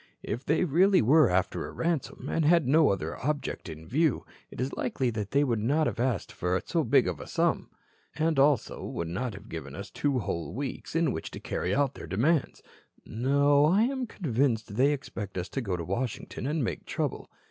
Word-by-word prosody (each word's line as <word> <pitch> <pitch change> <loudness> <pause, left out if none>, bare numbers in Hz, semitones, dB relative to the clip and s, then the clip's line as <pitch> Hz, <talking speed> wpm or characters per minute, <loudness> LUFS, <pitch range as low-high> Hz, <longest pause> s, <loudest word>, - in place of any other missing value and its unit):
If 120 +5 -4
they 155 +5 +2
really 180 - +4
were 150 +4 +6
after 90 0 0
a - - -8
ransom, 165 -4 -2
and 165 - 0
had 165 -2 +4
no 155 +2 +5
other 90 -2 -3
object 145 - -2
in 80 0 -9
view, 150 - +1 0.2
it - - -11
is 130 +2 -2
likely 125 0 -1
they 110 +6 0
would 120 -6 0
not 145 +9 +2
have - - -2
asked 120 -5 0
for 90 +1 -1
so - - 0
big - - +4
a - - -4
sum, - - 0 0.5
and 155 -2 +1
also 140 -3 +2
would 85 - -4
not 105 +5 -3
have 100 +2 -11
given 75 - -7
us 100 +2 -8
two 140 -3 0
whole 95 -6 -3
weeks 140 +3 -5
in 165 -4 +2
which 80 - -4
to - - -8
carry 90 - -2
out 140 -1 +2
their - - -9
demands. 130 - +1 0.4
No, 140 +4 +3
I 190 +8 +4
am 260 0 -1
convinced 120 - -1
they 135 +5 +4
expect 105 -9 -5
us 90 +1 -3
to 135 - -3
go 95 -6 -2
to 85 - -5
Washington 120 +5 -3
and 150 0 0
make - - -4
trouble. - - -3
130 Hz, 200 wpm, -28 LUFS, 100-150 Hz, 0.5 s, were